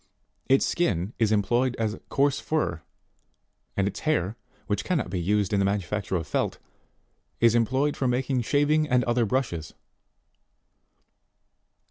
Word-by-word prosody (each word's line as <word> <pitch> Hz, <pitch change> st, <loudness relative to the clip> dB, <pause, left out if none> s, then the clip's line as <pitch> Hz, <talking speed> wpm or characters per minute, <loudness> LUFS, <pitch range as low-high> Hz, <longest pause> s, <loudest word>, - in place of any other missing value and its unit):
Its 135 Hz, +1 st, +4 dB
skin 100 Hz, -, 0 dB
is 110 Hz, -2 st, +2 dB
employed 120 Hz, +5 st, +2 dB
as 110 Hz, -1 st, -1 dB
coarse 140 Hz, 0 st, +2 dB
fur, 90 Hz, -, -1 dB, 1.0 s
and 100 Hz, 0 st, +2 dB
its 100 Hz, -, -4 dB
hair, 115 Hz, -, 0 dB, 0.3 s
which 105 Hz, -2 st, -1 dB
cannot 155 Hz, -, -1 dB
be 95 Hz, -, -1 dB
used 100 Hz, +2 st, +1 dB
in 100 Hz, -, +3 dB
the -, -, +3 dB
manufacture 100 Hz, 0 st, -1 dB
of 85 Hz, -3 st, -1 dB
felt, -, -, -1 dB, 0.8 s
is 115 Hz, -1 st, +5 dB
employed 130 Hz, +5 st, +1 dB
for 130 Hz, -, -1 dB
making 125 Hz, +1 st, 0 dB
shaving 150 Hz, +5 st, +2 dB
and 125 Hz, -1 st, +3 dB
other 120 Hz, -1 st, +1 dB
brushes 100 Hz, -, -1 dB
14. -, -, -40 dB
115 Hz, 140 wpm, -26 LUFS, 100-135 Hz, 1.0 s, is